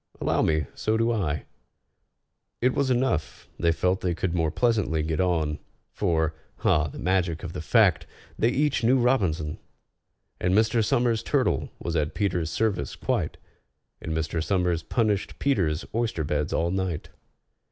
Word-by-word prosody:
"Allow - - +1
me, 80 -2 +2
so 110 +1 0
do 115 +1 +2
I." 75 - -1 1.1
It 125 +1 +2
was 140 -2 +1
enough: 125 -10 0
they 85 -1 +3
felt 90 +3 0
they 90 -2 0
could 90 0 -1
more 80 -2 +1
pleasantly 105 -7 +1
get 80 0 -2
on, 80 -5 0 0.3
For 80 -5 0 0.3
(ah, 75 0 +3
the 70 - -9
magic 90 -3 0
of 85 - -5
the - - -4
fact!) 80 - +3 0.3
they 115 - +2
each 140 +1 +1
knew 125 +4 +5
ROBINSON! 95 -12 +1 0.8
And 90 +1 +1
Mr. 110 +1 +3
SOMERS' 120 0 +2
turtle - - 0
was 85 - -4
at 75 -2 0
PETER'S 90 -6 0
service 95 -7 -1
quite, - - -1 0.6
And 80 - -5
Mr. 80 +1 -1
SOMERS 90 -3 +1
punished 105 0 0
PETER'S 90 - 0
oyster 110 -8 -1
beds 75 0 -1
all 85 +1 0
night. 95 -4 -2
90 Hz, 150 wpm, -26 LUFS, 80-110 Hz, 1.1 s, knew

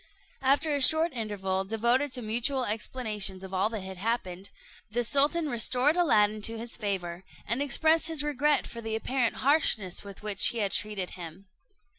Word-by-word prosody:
After 285 +3 +2
a 285 - 0
short 315 +5 +5
interval, 195 -5 -3
devoted 235 +7 +1
to 250 - -3
mutual 245 +4 0
explanations 210 -3 -2
of 190 0 -9
all 190 +3 +1
that 220 -4 -6
had 190 0 -8
happened, 195 -3 -3 0.4
the 240 +3 -1
sultan 290 +6 +1
restored 255 +4 +1
Aladdin 215 -11 +2
to 225 +2 -2
his 230 +1 -5
favour, 190 -5 -4 0.2
and 235 +5 -1
expressed 315 +4 +3
his 320 -3 -1
regret 295 0 +1
for 235 - -8
the 220 -1 -3
apparent 245 +1 0
harshness 230 - +1
with 200 0 -12
which 205 -3 +4
he 235 - -2
had 205 -3 -1
treated 205 -4 -2
him. 175 +2 -10
225 Hz, 170 wpm, -28 LUFS, 200-275 Hz, 0.4 s, short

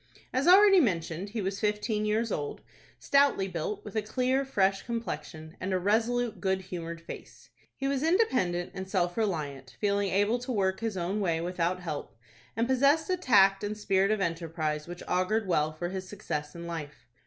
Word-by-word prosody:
As 260 +5 +1
already 390 +1 +8
mentioned, 180 - -1
he 215 0 -3
was 195 +1 -2
fifteen 210 0 0
years 220 +1 0
old, 145 -4 -3 0.4
stoutly 275 -9 +3
built, 180 +3 -4
with 210 - -9
a 220 - +2
clear, 255 +5 0
fresh 195 -7 +1
complexion, 160 -8 -5
and 185 - -3
a 185 - +2
resolute, 225 +4 0
good 190 -1 0
humored 170 -2 -6
face. 165 - -11 0.2
He 270 - -2
was 275 -1 0
independent 260 - +1
and 190 0 -6
self 175 -3 0
reliant, 150 - -3
feeling 200 -1 +1
able 205 +6 +2
to 250 +2 -5
work 190 -4 0
his 225 -3 -3
own 185 +4 -1
way 170 -5 +1
without 180 +1 -1
help, 155 -8 -6 0.4
and 230 +1 +1
possessed 280 +7 +3
a - - +3
tact 200 - +4
and 210 +1 -3
spirit 195 -2 +2
of 215 -2 +1
enterprise 165 -3 -2
which 175 0 -8
augured 195 +4 +1
well 155 -3 +2
for 175 +3 -4
his 185 0 -6
success 150 -7 -5
in 170 0 -7
life. 160 -3 -7
195 Hz, 180 wpm, -29 LUFS, 175-225 Hz, 0.4 s, already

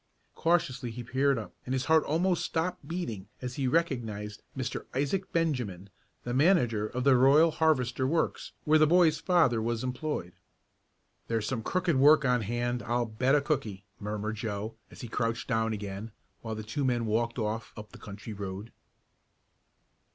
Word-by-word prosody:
Cautiously 165 -8 0
he 120 +2 -6
peered 135 +3 +1
up, 110 - -6
and 130 - -3
his 130 0 -1
heart 160 0 +4
almost 175 +4 +1
stopped 165 -3 -2
beating 120 - -4
as 125 -1 -5
he 135 -2 0
recognized 115 -9 -1 0.2
Mr. 130 - -4
Isaac 165 +8 -1
Benjamin, 120 - -1 0.3
the 120 - -3
manager 125 - +3
of 125 +3 -3
the 135 -1 +5
Royal 140 +6 +6
Harvester 130 -5 +1
Works 160 +4 -1
where 155 +1 +4
the 155 - +6
boy's 165 -2 +4
father 160 -9 +3
was 115 +1 -1
employed. 125 - -3 0.9
"There's 115 -2 -1
some 125 -4 -2
crooked 175 +3 0
work 150 +2 +6
on 125 -2 +3
hand, 120 +3 -2
I'll 120 +1 0
bet 130 +5 +1
a 145 - +3
cookie!" 110 - -2
murmured 105 +1 -3
Joe, 110 0 -4 0.2
as - - -12
he 120 - -6
crouched 115 +1 -2
down 115 -2 +1
again 105 +1 -5 0.3
while 110 -1 -4
the 110 - -6
two 115 +7 -3
men 120 -3 +1
walked 115 +2 0
off 110 0 -3
up 105 -1 -9
the - - -13
country 105 +2 -8
road. 100 +2 -6
125 Hz, 165 wpm, -29 LUFS, 110-150 Hz, 0.9 s, Royal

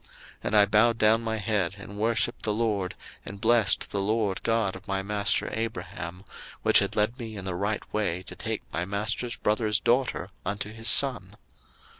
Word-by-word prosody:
01:024:048 - - -25 0.4
And 110 - 0
I 105 -1 +7
bowed 110 +3 +3
down 110 +1 +4
my 110 -1 -2
head, 100 -4 -1
and 100 0 -10
worshipped 115 +2 +1
the 105 - 0
LORD, 105 -5 -1 0.3
and 100 - -8
blessed 115 0 +2
the 100 - -1
LORD 105 -1 0
God 115 -4 0
of 95 +2 -12
my 95 -1 -1
master 105 0 +1
Abraham, 105 -5 -5 0.4
which - - +6
had - - -2
led 110 +5 0
me 110 -3 -7
in 95 - -7
the 95 - -3
right 100 +4 -2
way 95 -4 -1
to - - -8
take - - -4
my 85 - -1
master's 105 +5 -2
brother's 105 0 +1
daughter 125 +1 0
unto 100 +2 -4
his 115 +1 -5
son. 110 -6 +5
105 Hz, 185 wpm, -27 LUFS, 100-115 Hz, 0.4 s, I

